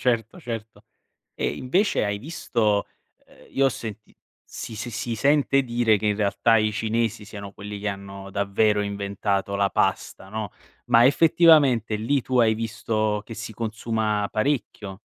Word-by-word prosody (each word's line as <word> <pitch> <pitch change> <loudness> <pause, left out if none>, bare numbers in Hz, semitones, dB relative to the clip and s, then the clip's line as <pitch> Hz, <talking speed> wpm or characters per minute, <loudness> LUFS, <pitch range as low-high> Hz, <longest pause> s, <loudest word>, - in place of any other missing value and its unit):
Certo, 125 +8 -1
certo 115 -5 -7 0.5
e - - -2
invece 180 - +1
hai 105 -1 -1
visto 110 -6 0 0.4
ehm, - - -20
io 135 - +2
ho - - +4
senti 110 -3 -8 0.3
si 110 - -8
si 120 +3 -5
si 120 +1 -3
sente 140 +2 +3
dire 120 -3 +2
che 105 +1 -1
in 105 -1 +1
realtà 110 +2 +3
i 110 -1 +1
cinesi 110 0 -1
siano 100 -1 -9
quelli 105 0 -7
che 105 - -4
hanno 100 0 -6
davvero 105 +1 +1
inventato 100 -1 -2
la 100 0 +2
pasta, 95 - -1
no, 105 -1 -5 0.4
ma 120 0 +6
effettivamente 145 -6 +5
lì 120 +6 0
tu 130 +1 0
hai 110 -2 +4
visto 110 -1 -1
che 115 - -9
si 110 0 -7
consuma 110 -1 -1
parecchio? 110 -5 -2
110 Hz, 155 wpm, -24 LUFS, 105-120 Hz, 0.5 s, ma